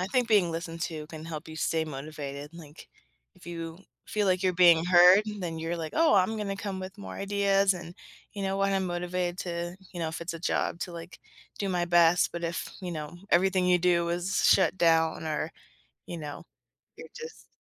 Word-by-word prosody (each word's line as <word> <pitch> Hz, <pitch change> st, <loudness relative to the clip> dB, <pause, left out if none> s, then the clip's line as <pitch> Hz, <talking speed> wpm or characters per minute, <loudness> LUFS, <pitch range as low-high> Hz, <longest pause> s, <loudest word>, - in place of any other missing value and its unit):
I 180 Hz, -, -1 dB
think 250 Hz, +1 st, +1 dB
being 200 Hz, -6 st, +4 dB
listened 165 Hz, 0 st, -5 dB
to 155 Hz, -4 st, -4 dB
can 160 Hz, -1 st, -9 dB
help 160 Hz, -1 st, -7 dB
you 160 Hz, -, -9 dB
stay 160 Hz, 0 st, 0 dB
motivated, 145 Hz, -1 st, -7 dB
like, 155 Hz, -2 st, -13 dB, 0.5 s
if -, -, -18 dB
you 165 Hz, -1 st, -6 dB, 0.3 s
feel, 210 Hz, -1 st, 0 dB
like, 185 Hz, -1 st, +2 dB
you're 185 Hz, -1 st, +2 dB
being 170 Hz, -2 st, +6 dB
heard, 180 Hz, +3 st, +7 dB
and 210 Hz, -2 st, -5 dB
then 165 Hz, -2 st, -4 dB
you're, 165 Hz, +2 st, -3 dB
like, 160 Hz, -2 st, -5 dB
"Oh, 320 Hz, -6 st, +4 dB
I'm 200 Hz, +3 st, +3 dB
gonna 200 Hz, -2 st, -3 dB
come 200 Hz, -1 st, -4 dB
with 190 Hz, +2 st, -7 dB
more 200 Hz, -, -8 dB
ideas 200 Hz, -1 st, +2 dB
and, 175 Hz, -1 st, -9 dB, 0.4 s
you 200 Hz, -, -5 dB
know 195 Hz, 0 st, -1 dB
what, 195 Hz, 0 st, +1 dB
I'm 190 Hz, -1 st, 0 dB
motivated 175 Hz, 0 st, -2 dB
to 175 Hz, -1 st, -4 dB, 0.2 s
you 175 Hz, -, -7 dB
know, 165 Hz, -2 st, -1 dB
if 160 Hz, -, -6 dB
it's 170 Hz, 0 st, -4 dB
a -, -, -6 dB
job 170 Hz, 0 st, -1 dB
to, 180 Hz, -, -4 dB
like, 170 Hz, +1 st, -9 dB, 0.4 s
do 200 Hz, -, -2 dB
my 180 Hz, -2 st, 0 dB
best," 175 Hz, 0 st, +4 dB
but 170 Hz, 0 st, -4 dB
if, 170 Hz, +1 st, -3 dB
you 180 Hz, -2 st, -5 dB
know, 155 Hz, +1 st, -6 dB
everything 185 Hz, +1 st, +3 dB
you 180 Hz, 0 st, +4 dB
do 170 Hz, -1 st, +2 dB
is 175 Hz, +2 st, -1 dB
shut 190 Hz, -1 st, +4 dB
down 165 Hz, -2 st, +3 dB
or, 155 Hz, 0 st, -2 dB, 0.6 s
you 175 Hz, -, -6 dB
know, 150 Hz, -2 st, -7 dB, 0.5 s
you're 475 Hz, -, -11 dB
just 470 Hz, -1 st, -10 dB
175 Hz, 210 wpm, -28 LUFS, 165-190 Hz, 0.6 s, heard